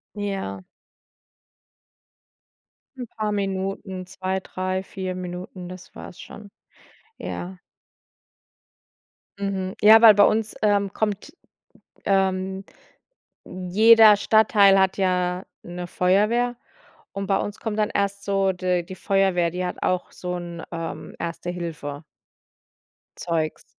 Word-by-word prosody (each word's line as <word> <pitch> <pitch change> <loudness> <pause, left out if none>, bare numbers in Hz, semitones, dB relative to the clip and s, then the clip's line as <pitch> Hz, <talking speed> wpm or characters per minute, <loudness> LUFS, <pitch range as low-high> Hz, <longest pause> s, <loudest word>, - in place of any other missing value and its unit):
Ja. 195 - -4 2.4
'N 250 - -4
paar 215 -1 -3
Minuten, 195 -1 -3
2, 190 0 -3
3, 185 0 -3
4 185 -1 -5
Minuten, 180 0 -7
das 185 -1 -12
war's 180 - -10
schon. 205 -1 -11 0.7
Ja. 180 +1 -6 1.8
Mhm. 190 -1 -3
Ja 220 +1 +8
weil 225 -2 +10
bei 205 - +6
uns, 220 0 0
ähm, 200 -2 +2
kommt, 210 -2 -3 0.7
ähm 190 0 0 0.8
jeder 210 +4 +6
Stadtteil 205 -2 +4
hat 190 0 +2
ja 180 -1 0 0.2
'ne 175 0 -6
Feuerwehr 210 +8 +1 0.6
und 195 0 -4
bei 195 - +2
uns 205 - -4
kommt 220 -2 -4
dann 215 -1 +1
erst 200 0 -1
so 195 -1 +1
d 180 -1 -1
die 185 +2 -9
Feuerwehr, 190 -3 +1
die 180 +1 -3
hat 180 - -4
auch 185 -1 -1
so 180 0 -5
'n, 170 -1 -7
ähm, 165 -1 -6
Erste-Hilfe. 165 -4 -5 1.1
Zeugs. 160 -3 -2
190 Hz, 110 wpm, -23 LUFS, 180-200 Hz, 2.4 s, weil